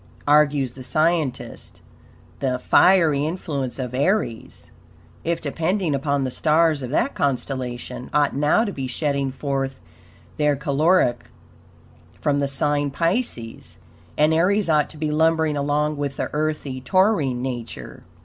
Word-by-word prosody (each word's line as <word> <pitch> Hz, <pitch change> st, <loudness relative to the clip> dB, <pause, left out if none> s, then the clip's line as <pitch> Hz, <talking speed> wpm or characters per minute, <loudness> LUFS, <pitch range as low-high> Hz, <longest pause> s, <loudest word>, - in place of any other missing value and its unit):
Argues 145 Hz, -3 st, +3 dB
the 130 Hz, -, -11 dB
scientist: 155 Hz, 0 st, -1 dB, 0.6 s
The 130 Hz, -2 st, 0 dB
"fiery 160 Hz, 0 st, +4 dB
influence 150 Hz, -6 st, -3 dB
of 125 Hz, -2 st, -5 dB
Aries," 140 Hz, -, -2 dB, 0.5 s
if 170 Hz, 0 st, -1 dB
depending 165 Hz, +3 st, -1 dB
upon 140 Hz, 0 st, 0 dB
the 130 Hz, -, -2 dB
stars 155 Hz, +1 st, +2 dB
of 125 Hz, -, -5 dB
that 240 Hz, -, 0 dB
constellation, 125 Hz, -2 st, -3 dB
ought 145 Hz, -2 st, +2 dB
now 150 Hz, +10 st, +3 dB
to 205 Hz, -, -3 dB
be 135 Hz, -7 st, -4 dB
shedding 140 Hz, +1 st, -1 dB
forth 135 Hz, 0 st, -3 dB, 0.6 s
their 150 Hz, -1 st, +2 dB
caloric 140 Hz, -1 st, +1 dB, 0.9 s
from 145 Hz, -1 st, +1 dB
the 140 Hz, -, 0 dB
sign 145 Hz, +1 st, 0 dB
Pisces, 140 Hz, -, -2 dB, 0.4 s
and 155 Hz, +1 st, +4 dB
Aries 185 Hz, +4 st, +2 dB
ought 150 Hz, -2 st, +2 dB
to 160 Hz, -, -12 dB
be 150 Hz, 0 st, -2 dB
lumbering 160 Hz, 0 st, +2 dB
along 145 Hz, +1 st, 0 dB
with 140 Hz, -1 st, -3 dB
the -, -, -3 dB
earthy 150 Hz, -3 st, -2 dB
Taurine 140 Hz, -, +1 dB
nature. 120 Hz, -3 st, -6 dB
145 Hz, 130 wpm, -22 LUFS, 135-160 Hz, 0.9 s, fiery